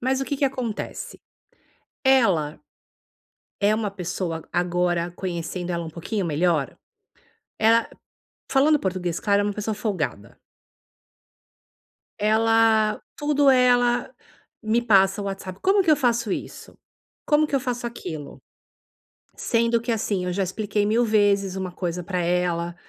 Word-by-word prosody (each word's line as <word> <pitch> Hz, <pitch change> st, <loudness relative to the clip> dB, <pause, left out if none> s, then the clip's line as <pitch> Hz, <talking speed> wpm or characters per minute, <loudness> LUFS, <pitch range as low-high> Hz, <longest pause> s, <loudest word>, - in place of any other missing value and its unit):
Mas 260 Hz, +2 st, 0 dB
o -, -, -1 dB
que 285 Hz, -, -3 dB
que 280 Hz, -, +1 dB
acontece? 255 Hz, -5 st, -4 dB, 0.8 s
Ela 195 Hz, -, +3 dB, 1.0 s
é 210 Hz, +1 st, +3 dB
uma 215 Hz, -2 st, -2 dB
pessoa, 175 Hz, -3 st, -4 dB
agora 175 Hz, -1 st, 0 dB
conhecendo 180 Hz, 0 st, -4 dB
ela 170 Hz, -1 st, -3 dB
um 160 Hz, -, -7 dB
pouquinho 185 Hz, +5 st, -3 dB
melhor, 155 Hz, -3 st, 0 dB, 0.8 s
ela, 225 Hz, +1 st, +4 dB, 0.6 s
falando 295 Hz, +2 st, +4 dB
português 180 Hz, -4 st, -2 dB
claro, 200 Hz, -1 st, +2 dB
é -, -, -1 dB
uma 205 Hz, -, -1 dB
pessoa 210 Hz, +1 st, -3 dB
folgada. 155 Hz, -, -4 dB, 1.8 s
Ela 220 Hz, 0 st, +3 dB, 0.2 s
tudo 290 Hz, -1 st, +2 dB
ela 245 Hz, -2 st, +3 dB, 0.5 s
me 225 Hz, +2 st, +1 dB
passa 195 Hz, -3 st, +3 dB
no 200 Hz, -, -4 dB
WhatsApp, 195 Hz, -1 st, -6 dB
"como 390 Hz, 0 st, +3 dB
que 325 Hz, -, +3 dB
eu 305 Hz, -, +6 dB
faço 235 Hz, -6 st, 0 dB
isso? -, -, -6 dB, 0.5 s
Como 305 Hz, 0 st, +3 dB
que 290 Hz, -, -2 dB
eu -, -, +2 dB
faço 245 Hz, -1 st, -3 dB
aquilo"? 160 Hz, -11 st, -7 dB, 1.0 s
Sendo 230 Hz, 0 st, +1 dB
que 235 Hz, 0 st, -2 dB
assim, 205 Hz, -4 st, -1 dB
eu 180 Hz, -, -2 dB
já 195 Hz, +2 st, -1 dB
expliquei 205 Hz, +2 st, -1 dB
mil 225 Hz, +3 st, +2 dB
vezes 200 Hz, -3 st, +2 dB
uma 185 Hz, -1 st, -3 dB
coisa 180 Hz, -1 st, -4 dB
para 180 Hz, 0 st, -3 dB
ela, 175 Hz, -1 st, 0 dB
205 Hz, 135 wpm, -24 LUFS, 180-235 Hz, 1.8 s, eu